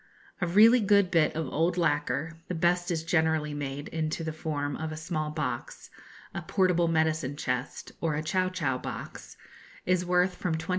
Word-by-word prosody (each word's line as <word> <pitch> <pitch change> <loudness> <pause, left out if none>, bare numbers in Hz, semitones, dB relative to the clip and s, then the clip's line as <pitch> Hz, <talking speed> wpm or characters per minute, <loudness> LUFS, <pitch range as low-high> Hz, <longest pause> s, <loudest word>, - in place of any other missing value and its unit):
A 175 - +1
really 220 +7 +7
good 200 -3 +3
bit 160 -4 +3
of 160 0 -1
old 170 +5 +1
lacquer 160 0 0
(the 180 - -3
best 175 +2 +1
is 165 -2 -1
generally 160 -2 +1
made 145 0 -4
into 160 0 -2
the 160 -1 -3
form 145 -3 -3
of 160 0 -4
a 155 - -6
small 155 -1 -3
box, 145 -6 -4 0.4
a - - -4
portable 180 -3 +2
medicine 160 -3 +1
chest, 125 -2 -3
or 160 -3 0
a 155 - -2
chow 185 +4 +1
chow 145 -9 -1
box) - - -8 0.5
is 180 0 +2
worth 180 +1 +2
from 175 -2 -2
20_l_. 160 - -8
160 Hz, 180 wpm, -28 LUFS, 150-180 Hz, 0.5 s, really